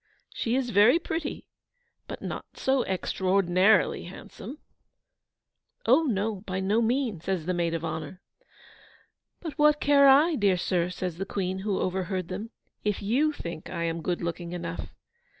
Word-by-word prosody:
she 230 Hz, +1 st, -1 dB
is 255 Hz, -2 st, 0 dB
very 215 Hz, -, +6 dB
pretty, 320 Hz, -2 st, -4 dB, 0.6 s
but -, -, -7 dB
not -, -, -6 dB
so 265 Hz, 0 st, +2 dB
EXTRAORDINARILY 190 Hz, +1 st, +2 dB
handsome.' 205 Hz, -, -9 dB, 1.3 s
'Oh 265 Hz, +8 st, +5 dB
no, 215 Hz, -4 st, 0 dB
by 185 Hz, -2 st, -4 dB
no 200 Hz, +4 st, +2 dB
means!' 230 Hz, -, 0 dB
says 185 Hz, -5 st, -1 dB
the 180 Hz, -, 0 dB
Maid 170 Hz, -1 st, 0 dB
of 165 Hz, 0 st, -3 dB
Honour. 160 Hz, +2 st, -5 dB, 1.2 s
'But 320 Hz, -4 st, -7 dB
what 300 Hz, 0 st, +5 dB
care 280 Hz, -1 st, +5 dB
I, 290 Hz, +5 st, +6 dB
dear 200 Hz, -9 st, +2 dB
sir,' 175 Hz, -1 st, 0 dB
says 180 Hz, -2 st, -4 dB
the 195 Hz, -, -2 dB
Queen, 190 Hz, -1 st, -2 dB
who 195 Hz, 0 st, -1 dB
overheard 185 Hz, -1 st, -2 dB
them, 205 Hz, +5 st, -5 dB, 0.3 s
'if 210 Hz, -1 st, -1 dB
YOU 265 Hz, +9 st, +2 dB
think 170 Hz, -, -7 dB
I 170 Hz, -, -3 dB
am 165 Hz, 0 st, -2 dB
good 175 Hz, +1 st, -2 dB
looking 170 Hz, 0 st, -4 dB
enough? 170 Hz, -1 st, -5 dB
195 Hz, 150 wpm, -27 LUFS, 180-245 Hz, 1.3 s, very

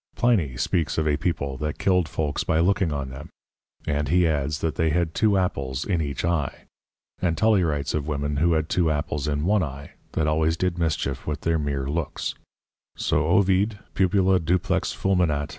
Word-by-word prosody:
Pliny 90 Hz, -, +1 dB
speaks 80 Hz, +4 st, 0 dB
of 80 Hz, -1 st, +1 dB
a 75 Hz, -, +3 dB
People 70 Hz, -5 st, -2 dB
that 75 Hz, +2 st, -3 dB
killed 90 Hz, -4 st, +2 dB
folks 75 Hz, -3 st, -2 dB
by 80 Hz, -, +1 dB
looking 90 Hz, 0 st, +2 dB
on 70 Hz, -2 st, -3 dB
them; 65 Hz, -, -9 dB, 0.6 s
and 75 Hz, 0 st, -1 dB
he 90 Hz, +1 st, +4 dB
adds, 75 Hz, -1 st, 0 dB
that 80 Hz, -2 st, 0 dB
they 80 Hz, 0 st, +1 dB
had 85 Hz, 0 st, 0 dB
two 105 Hz, -3 st, +3 dB
Apples 70 Hz, -7 st, -1 dB
in 90 Hz, -5 st, 0 dB
each 70 Hz, 0 st, -3 dB
Eye: 80 Hz, -6 st, -1 dB, 0.6 s
and 85 Hz, -3 st, +1 dB
Tully 110 Hz, -4 st, +4 dB
writes 75 Hz, -4 st, -1 dB
of 75 Hz, -1 st, -2 dB
women 70 Hz, -1 st, -2 dB
who 85 Hz, +3 st, +3 dB
had 80 Hz, -1 st, 0 dB
two 85 Hz, 0 st, +1 dB
Apples 75 Hz, -1 st, -2 dB
in 75 Hz, +1 st, -1 dB
one 105 Hz, +2 st, +3 dB
Eye 70 Hz, -3 st, -5 dB, 0.2 s
that 80 Hz, -, +1 dB
always 80 Hz, +2 st, +1 dB
did 90 Hz, -1 st, -1 dB
mischief 75 Hz, -5 st, -1 dB
with 75 Hz, -1 st, -3 dB
their 80 Hz, -1 st, +1 dB
meer 70 Hz, -2 st, -2 dB
looks; 80 Hz, +1 st, -2 dB, 0.6 s
so 75 Hz, +1 st, 0 dB
Ovid, 100 Hz, +3 st, +3 dB, 0.2 s
_Pupula 95 Hz, -1 st, +3 dB
duplex 90 Hz, +2 st, +1 dB
fulminat. 85 Hz, -7 st, 0 dB
80 Hz, 185 wpm, -24 LUFS, 75-90 Hz, 0.6 s, he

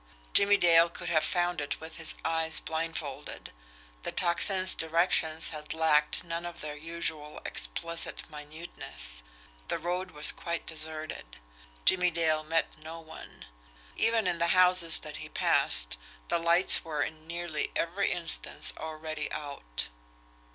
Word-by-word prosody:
Jimmie 200 Hz, 0 st, +6 dB
Dale 170 Hz, -1 st, +5 dB
could -, -, -6 dB
have 155 Hz, -2 st, +2 dB
found 175 Hz, -2 st, 0 dB
it 145 Hz, -, -3 dB
with 160 Hz, +1 st, -9 dB
his 155 Hz, -2 st, +2 dB
eyes 160 Hz, 0 st, +4 dB
blindfolded 160 Hz, -3 st, -5 dB, 0.5 s
the -, -, -4 dB
Tocsin's 185 Hz, +2 st, +4 dB
directions 160 Hz, -1 st, +2 dB
had 150 Hz, 0 st, -6 dB
lacked 155 Hz, -1 st, +2 dB
none 170 Hz, 0 st, -4 dB
of 175 Hz, 0 st, -7 dB
their 150 Hz, -1 st, -5 dB
usual 160 Hz, -1 st, -4 dB
explicit 165 Hz, -, -1 dB
minuteness. 150 Hz, -, -5 dB, 0.5 s
The -, -, 0 dB
road 180 Hz, +2 st, -3 dB
was 150 Hz, -3 st, +4 dB
quite 170 Hz, 0 st, -4 dB
deserted. 155 Hz, -, -5 dB, 0.5 s
Jimmie 180 Hz, -1 st, +4 dB
Dale 160 Hz, -2 st, +1 dB
met 160 Hz, 0 st, -1 dB
no 160 Hz, +2 st, -8 dB
one. 160 Hz, -1 st, -12 dB, 0.5 s
Even 225 Hz, -1 st, +2 dB
in 175 Hz, -2 st, 0 dB
the 170 Hz, -, +2 dB
houses 180 Hz, -2 st, +4 dB
that 150 Hz, -1 st, -8 dB
he -, -, -8 dB
passed -, -, +1 dB, 0.3 s
the -, -, +2 dB
lights 170 Hz, +2 st, +6 dB
were 155 Hz, -3 st, -2 dB
in 155 Hz, 0 st, -7 dB
nearly 170 Hz, -3 st, -3 dB
every 185 Hz, +4 st, 0 dB
instance 170 Hz, -2 st, -2 dB
already 155 Hz, -1 st, -5 dB
out. 140 Hz, -, -3 dB
160 Hz, 135 wpm, -29 LUFS, 155-170 Hz, 0.5 s, Jimmie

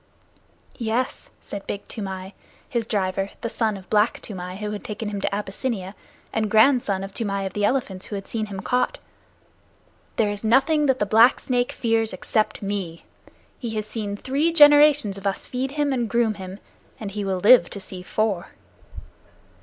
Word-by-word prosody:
"Yes," 235 Hz, +2 st, -2 dB
said 200 Hz, -1 st, -8 dB
Big 200 Hz, -, -5 dB
Toomai, 190 Hz, -2 st, -6 dB, 0.3 s
his 235 Hz, -2 st, -2 dB
driver, 195 Hz, -1 st, -1 dB
the 230 Hz, -, -3 dB
son 220 Hz, -3 st, 0 dB
of 190 Hz, -1 st, -13 dB
Black 210 Hz, +1 st, +3 dB
Toomai 180 Hz, -3 st, -6 dB
who 210 Hz, 0 st, -4 dB
had 210 Hz, -, -5 dB
taken 210 Hz, 0 st, -4 dB
him 200 Hz, -1 st, -4 dB
to -, -, 0 dB
Abyssinia, 200 Hz, -1 st, -3 dB, 0.4 s
and 220 Hz, -1 st, 0 dB
grandson 220 Hz, -3 st, +4 dB
of 195 Hz, 0 st, -7 dB
Toomai 200 Hz, -3 st, -2 dB
of 190 Hz, -, -4 dB
the 205 Hz, -, -2 dB
Elephants 205 Hz, -6 st, -1 dB
who 210 Hz, -, -5 dB
had 195 Hz, -1 st, -6 dB
seen 220 Hz, -2 st, -2 dB
him 195 Hz, -2 st, -6 dB
caught, 250 Hz, -, 0 dB, 1.2 s
"there 210 Hz, -2 st, +2 dB
is 205 Hz, +1 st, -5 dB
nothing 285 Hz, +7 st, +3 dB
that 265 Hz, -1 st, +3 dB
the 205 Hz, -, +1 dB
Black 225 Hz, +5 st, +5 dB
Snake 245 Hz, -1 st, 0 dB
fears 225 Hz, -3 st, 0 dB
except 215 Hz, +3 st, -1 dB
me. 195 Hz, -5 st, -4 dB, 0.5 s
He 230 Hz, -3 st, -4 dB
has 215 Hz, -1 st, -2 dB
seen 215 Hz, -2 st, -4 dB
three 280 Hz, +8 st, +1 dB
generations 295 Hz, -9 st, +6 dB
of 200 Hz, -, -3 dB
us 195 Hz, -, -2 dB
feed 260 Hz, +2 st, -3 dB
him 290 Hz, -2 st, +1 dB
and 240 Hz, -3 st, -1 dB
groom 235 Hz, -2 st, +2 dB
him, 190 Hz, -1 st, -8 dB, 0.4 s
and 210 Hz, -3 st, -5 dB
he 205 Hz, 0 st, -3 dB
will 190 Hz, -1 st, -1 dB
live 235 Hz, +7 st, +6 dB
to 200 Hz, -, -7 dB
see 190 Hz, -2 st, -8 dB
four." 200 Hz, -1 st, -1 dB
215 Hz, 175 wpm, -24 LUFS, 195-240 Hz, 1.2 s, generations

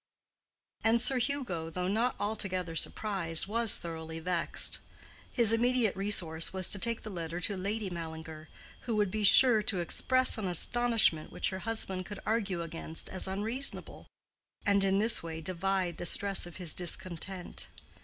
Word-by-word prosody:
And 225 Hz, +1 st, +2 dB
Sir 250 Hz, +2 st, +2 dB
Hugo, 235 Hz, -, -4 dB
though 180 Hz, +2 st, -5 dB
not 225 Hz, +6 st, -1 dB
altogether 185 Hz, -5 st, -2 dB
surprised, 170 Hz, -2 st, 0 dB
was 225 Hz, +1 st, +4 dB
thoroughly 160 Hz, -1 st, -8 dB
vexed. 170 Hz, +1 st, 0 dB, 0.5 s
His 230 Hz, -3 st, +4 dB
immediate 240 Hz, -2 st, 0 dB
resource 180 Hz, -5 st, +1 dB
was 190 Hz, -1 st, +1 dB
to 200 Hz, -, -1 dB
take 230 Hz, +2 st, 0 dB
the 215 Hz, -, -8 dB
letter 170 Hz, -1 st, -6 dB
to 200 Hz, +3 st, -1 dB
Lady 200 Hz, +1 st, -4 dB
Mallinger, 160 Hz, -2 st, -9 dB, 0.4 s
who 230 Hz, -, -2 dB
would 205 Hz, -3 st, 0 dB
be 215 Hz, +1 st, -4 dB
sure 225 Hz, +2 st, +6 dB
to 205 Hz, -2 st, -2 dB
express 255 Hz, +8 st, +4 dB
an 200 Hz, -, -4 dB
astonishment 225 Hz, -2 st, +3 dB
which -, -, -2 dB
her 190 Hz, -, -6 dB
husband 190 Hz, -5 st, -1 dB
could 205 Hz, -2 st, -9 dB
argue 200 Hz, -6 st, -2 dB
against 165 Hz, -1 st, -5 dB
as 190 Hz, -, -1 dB
unreasonable, 220 Hz, +8 st, -2 dB, 0.6 s
and 200 Hz, -1 st, +2 dB
in 195 Hz, 0 st, +1 dB
this 220 Hz, +2 st, +5 dB
way 160 Hz, -1 st, -7 dB
divide 185 Hz, +1 st, -3 dB
the 175 Hz, -, +1 dB
stress 195 Hz, -1 st, +3 dB
of 175 Hz, -, -13 dB
his 175 Hz, -5 st, -1 dB
discontent. 180 Hz, +1 st, -3 dB
195 Hz, 155 wpm, -29 LUFS, 170-220 Hz, 0.6 s, sure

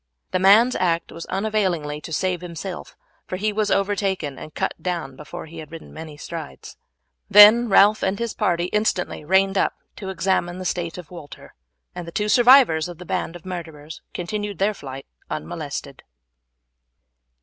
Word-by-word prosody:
The 185 Hz, -, +1 dB
man's 215 Hz, +7 st, +6 dB
act 170 Hz, -2 st, 0 dB
was 165 Hz, -, -8 dB
unavailing 185 Hz, -8 st, -1 dB
to 165 Hz, -, -9 dB
save 180 Hz, +3 st, -1 dB
himself, 175 Hz, +1 st, -7 dB, 0.3 s
for -, -, -4 dB
he 210 Hz, +2 st, -1 dB
was 210 Hz, 0 st, 0 dB
overtaken 195 Hz, -7 st, -1 dB
and 155 Hz, -, -9 dB
cut -, -, -2 dB
down 170 Hz, -7 st, -3 dB
before 150 Hz, +5 st, -9 dB
he 165 Hz, +1 st, -10 dB
had 155 Hz, -1 st, -10 dB
ridden 165 Hz, -1 st, -10 dB
many 155 Hz, -2 st, -9 dB
strides; 160 Hz, -1 st, -8 dB, 0.5 s
then 215 Hz, +3 st, +8 dB
Ralph 205 Hz, +2 st, +5 dB
and 190 Hz, +1 st, 0 dB
his 235 Hz, 0 st, -3 dB
party 175 Hz, -5 st, 0 dB
instantly 210 Hz, -6 st, 0 dB
reined 195 Hz, +3 st, +3 dB
up -, -, +1 dB, 0.2 s
to 195 Hz, -, -6 dB
examine 180 Hz, 0 st, 0 dB
the 185 Hz, -, -6 dB
state 175 Hz, -2 st, -2 dB
of 180 Hz, -2 st, -10 dB
Walter, 155 Hz, -5 st, -11 dB, 0.4 s
and 175 Hz, -, -7 dB
the -, -, -7 dB
two 210 Hz, +3 st, -1 dB
survivors 240 Hz, -, +6 dB
of 175 Hz, -, -9 dB
the 180 Hz, -, -10 dB
band 165 Hz, -, -3 dB
of 175 Hz, -, -12 dB
murderers 160 Hz, -4 st, -8 dB
continued 205 Hz, +2 st, -4 dB
their 200 Hz, +4 st, +1 dB
flight 135 Hz, -6 st, -9 dB, 0.2 s
unmolested. -, -, -6 dB
180 Hz, 165 wpm, -22 LUFS, 165-205 Hz, 0.5 s, then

